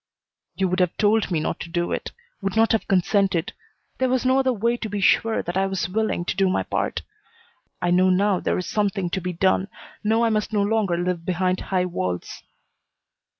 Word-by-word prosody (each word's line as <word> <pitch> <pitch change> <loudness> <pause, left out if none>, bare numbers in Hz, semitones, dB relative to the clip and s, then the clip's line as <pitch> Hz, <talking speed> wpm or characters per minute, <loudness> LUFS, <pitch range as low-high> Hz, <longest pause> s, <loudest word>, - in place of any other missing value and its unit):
"You 190 - +1
would 185 +1 -1
have 180 -2 +1
told 215 0 +2
me 170 -4 0
not 155 - -2
to 170 - -7
do 175 0 -1
it; - - -3 0.3
would 195 0 -2
not 225 0 +4
have 225 - 0
consented. 190 -2 +1 0.5
There 260 0 +2
was 255 0 0
no 260 +1 +4
other 265 -1 +2
way 235 +1 0
to 220 - -5
be 205 0 -3
sure 220 +3 +2
that 175 - -4
I 195 0 +2
was 190 -3 -2
willing 205 -2 -1
to - - -2
do 195 -1 +2
my - - 0
part. - - -2 0.8
I 175 - +2
know 185 +1 +4
now 190 0 +2
there - - -1
is 180 - -3
something 200 -4 -1
to 190 - -1
be 180 +1 -3
done, 185 +2 +2 0.4
know 220 +2 +2
I 230 - +2
must 215 0 -1
no 205 -1 +2
longer 205 -4 +1
live 175 -1 -2
behind 185 +1 0
high 185 -2 -1
walls." 90 - -4
190 Hz, 210 wpm, -23 LUFS, 180-215 Hz, 0.8 s, not